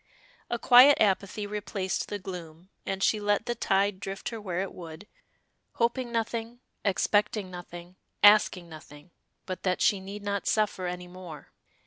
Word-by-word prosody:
A 240 - -1
quiet 255 +4 +7
apathy 200 0 +1
replaced 205 -2 -3
the 205 - -3
gloom, 180 -2 -9 0.2
and 195 0 -2
she 215 - +3
let 205 +1 0
the 240 - -1
tide 195 -3 +1
drift 195 0 -5
her 225 -2 -7
where 185 -3 -3
it 195 - -5
would, 165 +1 -10 0.7
hoping 240 +1 -1
nothing, 230 +1 -3 0.2
expecting 205 0 +1
nothing, 175 0 -10 0.3
asking 205 -4 +6
nothing 155 0 -13 0.3
but 185 -1 -5
that 185 -1 0
she 200 - +3
need 200 +2 -8
not 200 -1 -2
suffer 205 -4 0
any 180 0 -5
more. 175 -5 -11
195 Hz, 150 wpm, -28 LUFS, 180-210 Hz, 0.7 s, quiet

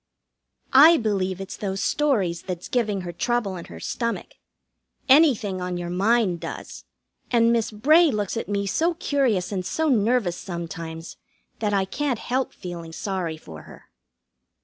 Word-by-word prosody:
I 310 +5 +8
believe 195 - -1
it's 195 - -6
those 195 -2 -3
stories 195 - +1
that's 180 -2 -6
giving 215 -6 0
her 175 -1 -5
trouble 235 -1 -1
in 175 - -7
her 80 - -11
stomach. 235 - -3 0.8
Anything 255 - +4
on 180 0 -3
your 175 0 -4
mind 195 -1 +2
does, - - -8 0.4
and 235 -1 +4
Miss 230 -2 +1
Bray 305 +10 +4
looks 210 -5 -2
at 230 - -4
me 200 0 -1
so 330 - +1
curious 255 - 0
and 190 -2 -2
so 320 - -1
nervous, 220 -6 +2
sometimes, 165 -2 -7 0.4
that 210 -2 0
I 195 -1 +2
can't 275 +4 -2
help 255 +4 -2
feeling 170 -2 -8
sorry 180 -4 -3
for 80 - -11
her. - - -16
205 Hz, 150 wpm, -24 LUFS, 180-245 Hz, 0.8 s, I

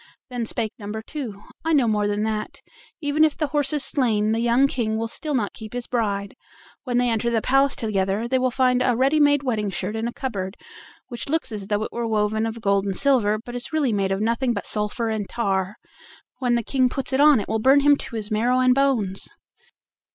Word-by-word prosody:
Then 240 -2 -3
spake 220 -2 -2
number 215 +1 -6
two: 230 -8 -7 0.2
"I 325 0 +1
know 270 -6 +4
more 210 -1 +1
than 205 +1 -1
that: 215 -1 -3 0.4
even 295 +1 +2
if 310 -2 +2
the 310 - 0
horse 290 -2 +1
is 295 -2 0
slain, 220 -6 +1
the 225 - +1
young 240 +3 +3
King 225 -5 -1
will 225 +1 -2
still 300 +5 -3
not 210 -6 -1
keep 220 0 -10
his 245 -1 -4
bride: 200 -5 -2 0.5
when 245 -2 0
they 245 0 +3
enter 235 0 +1
the 230 -1 +1
palace 270 +4 +2
together 205 0 -1
they 260 +1 +1
will 255 0 +2
find 250 0 +2
a 250 -1 +2
ready 270 +5 +2
made 290 -1 +4
wedding 220 -6 -1
shirt 190 +2 -3
in 225 +1 -2
a - - -3
cupboard, 200 -7 -4 0.5
which 240 +1 -5
looks 315 -4 -1
as 205 -3 -6
though 210 0 0
it - - -5
were 235 -1 -3
woven 220 0 0
of 225 0 -6
gold 200 -2 +2
and 195 - -2
silver, 235 -7 +2
but 240 - -8
is 245 0 -5
really 295 -7 +1
made 195 -2 0
of 195 +1 -1
nothing 235 +3 +1
but 200 - -4
sulphur 210 +2 -1
and 215 -3 -3
tar: 195 -3 -1 0.6
when 245 -2 +1
the 235 - 0
King 255 +2 +2
puts 270 +1 -4
it 265 - +2
on 295 -3 +6
it 200 - -4
will 220 +1 -1
burn 270 +5 +5
him 290 0 +5
to 255 - -8
his 215 -1 -4
marrow 235 +4 +2
and 255 0 +5
bones." 250 -8 +1
235 Hz, 230 wpm, -23 LUFS, 210-260 Hz, 0.6 s, on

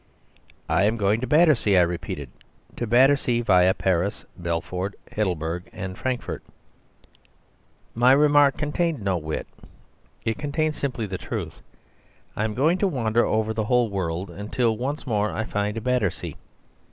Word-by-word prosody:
"I 100 - +3
am 110 +2 +1
going 105 +2 +1
to 130 - -2
Battersea," 150 - +4
I 90 - +6
repeated, 80 -6 -4 0.4
"to 120 - -3
Battersea 125 0 +4
viâ 90 -3 +4
Paris, 95 +2 0
Belfort, 90 +3 -3 0.2
Heidelberg, 90 -4 -2
and 95 0 -6
Frankfort. 130 +2 -3 1.5
My 120 +2 +4
remark 145 0 +5
contained 155 - -1
no 95 -2 +1
wit. 80 -1 -4 0.8
It 110 - -1
contained 155 +1 -1
simply 130 -6 -3
the 95 -3 -5
truth. - - -5 0.7
I 110 - 0
am 110 -1 -3
going 160 +8 +2
to 200 - +2
wander 120 - +1
over 110 0 0
the 110 -1 -1
whole 120 0 +2
world 90 -1 -3
until 110 +5 -1
once 140 +6 -4
more 105 -4 0
I 110 - -2
find 105 +1 -2
Battersea. 125 -6 -1
110 Hz, 140 wpm, -24 LUFS, 95-130 Hz, 1.5 s, I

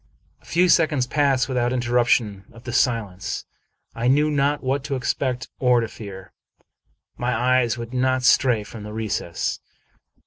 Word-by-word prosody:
A - - -25
few 180 +2 +2
seconds 155 -7 +3
passed 135 -2 +1
without 125 -2 0
interruption 120 -5 +1
of 115 +2 -15
the 120 -2 -6
silence. 105 -8 -1 0.5
I 115 +1 -2
knew 150 +4 +3
not 145 0 +1
what 135 +1 -1
to 140 -2 -2
expect 130 -1 -2
or 125 -2 +4
to 115 - -1
fear. 100 -4 -10 0.8
My 120 0 -1
eyes 125 0 +2
would 120 +1 -7
not 130 0 +1
stray 125 -4 +4
from 110 +1 -10
the 105 0 -8
recess. 105 -6 -3
125 Hz, 150 wpm, -23 LUFS, 115-130 Hz, 0.8 s, or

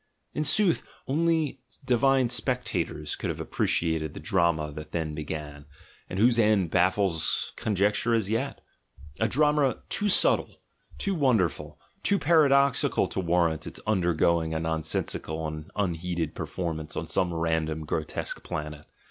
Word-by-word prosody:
In 150 - -1
sooth, 190 0 +4 0.3
only 160 -1 +1 0.3
divine 130 0 +3
spectators 105 - -1
could - - -4
have - - -4
appreciated 80 -3 -1
the - - -6
drama 85 -5 +1
that 75 +1 -9
then 80 -2 -2
began, 75 -1 -6 0.4
and 95 - -5
whose 120 +3 +4
end 105 -6 +3
baffles 90 -2 +1
conjecture 105 +3 +1
as 110 -4 0
yet 115 +2 -2 0.3
— 75 -2 -19
a - - +2
drama 150 -2 +2
too 205 - 0
subtle, - - +3 0.4
too 200 - -1
wonderful, 90 - 0 0.2
too 200 - +2
paradox 140 -5 +4
ical - - +1
to - - -2
warrant 85 -3 +1
its - - -7
undergoing 85 -4 +1
a - - 0
nonsensical 80 0 -2
and 75 0 -6
unheeded 85 -4 -2
performance 80 -4 -4
on - - -2
some 90 -2 0
random 80 -1 -1
grotesque - - -4
planet! 75 -1 -6
90 Hz, 140 wpm, -27 LUFS, 80-125 Hz, 0.4 s, sooth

